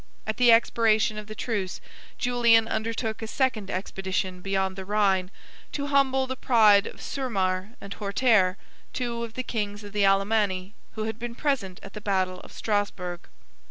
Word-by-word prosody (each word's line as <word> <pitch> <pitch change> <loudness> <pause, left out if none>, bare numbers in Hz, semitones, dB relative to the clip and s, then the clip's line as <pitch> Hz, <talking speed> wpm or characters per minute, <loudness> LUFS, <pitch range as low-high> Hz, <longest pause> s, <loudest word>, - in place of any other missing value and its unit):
At 220 -1 -3
the 245 -1 +6
expiration 225 -2 +3
of 210 - -9
the 215 - -8
truce, 205 -5 -3 0.4
Julian 235 -2 +4
undertook 225 0 -2
a 220 - -4
second 225 -5 0
expedition 185 -1 -3
beyond 190 0 -1
the 190 - -6
Rhine, 195 -2 +1 0.4
to 285 - -2
humble 265 -1 +3
the 260 0 -4
pride 215 -6 +5
of - - -10
Surmar 195 -6 -2
and 200 - -7
Hortaire, 200 -3 +2 0.4
two 235 -2 -2
of 230 -1 -7
the 255 - -2
kings 205 -3 -3
of 205 0 -10
the 205 -1 +1
Alemanni, 195 -1 +1 0.2
who 220 - -3
had 220 +1 -4
been 235 0 -5
present 245 -11 -1
at 195 - -10
the 210 - -7
battle 185 -3 0
of - - -14
Strasburgh. 195 -4 -2
210 Hz, 165 wpm, -26 LUFS, 195-235 Hz, 0.4 s, the